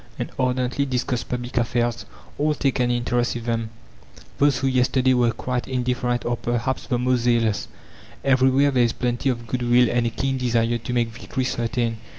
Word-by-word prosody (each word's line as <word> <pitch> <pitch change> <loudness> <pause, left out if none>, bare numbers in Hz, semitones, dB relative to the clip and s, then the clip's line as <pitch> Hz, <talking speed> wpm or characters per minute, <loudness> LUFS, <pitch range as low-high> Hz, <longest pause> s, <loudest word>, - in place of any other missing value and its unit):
and - - -4
ardently 130 +1 0
discuss 125 -2 -1
public 125 0 -5
affairs. 120 0 0 0.3
All 150 +1 +2
take 135 -2 0
an 125 -1 +2
interest 120 0 0
in 120 - -5
them; 115 -1 -2 0.7
those 145 -2 +4
who 130 - -2
yesterday 130 0 +2
were 120 -2 +3
quite 125 +2 -3
indifferent 125 -1 -1
are 120 0 0
perhaps 120 +3 -2
the 125 - 0
most 125 +1 +1
zealous. 115 -3 +1 0.6
Everywhere 135 +1 +4
there 130 -2 +2
is 115 - +1
plenty 125 +2 -1
of 120 -2 -2
good 125 +3 -3
will 120 0 +4
and 120 -1 +1
a - - +1
keen 135 +3 -2
desire 120 -1 +1
to 120 +2 -5
make 120 -2 +1
victory 120 +3 -4
certain. 120 -2 -1
125 Hz, 180 wpm, -23 LUFS, 120-130 Hz, 0.7 s, those